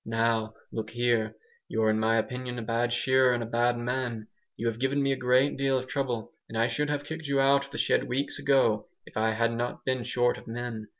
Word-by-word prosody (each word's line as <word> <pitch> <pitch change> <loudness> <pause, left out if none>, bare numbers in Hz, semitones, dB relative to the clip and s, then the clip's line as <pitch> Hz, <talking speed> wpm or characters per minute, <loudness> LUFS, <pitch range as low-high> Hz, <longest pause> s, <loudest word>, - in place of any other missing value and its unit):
"Now 115 0 0 0.2
look 110 -1 -4
here! 120 -2 0 0.3
You're 110 -1 +2
in 110 - +1
my 110 +1 +3
opinion 125 +2 -3
a 120 - -4
bad 115 +2 0
shearer 130 +1 +3
and 120 - -2
a - - -4
bad 120 +1 +1
man. 120 -2 -3 0.3
You 115 - -4
have 115 -1 -1
given 135 +2 +1
me 135 - +2
a - - +2
great 130 +2 +2
deal 135 -1 +2
of 130 - -3
trouble, 130 -5 -3 0.2
and 115 - -5
I 115 +2 +2
should 145 +5 -1
have 145 0 -2
kicked 160 0 -6
you 140 0 +1
out 140 +1 +4
of 140 - -16
the 150 - -6
shed - - +2
weeks 135 +3 -2
ago 125 -6 +2 0.2
if - - -15
I 110 +1 +2
had 115 +1 +1
not 120 +1 -3
been 130 -1 0
short 120 +1 +1
of - - -16
men. 115 -2 -5
120 Hz, 235 wpm, -28 LUFS, 115-130 Hz, 0.3 s, out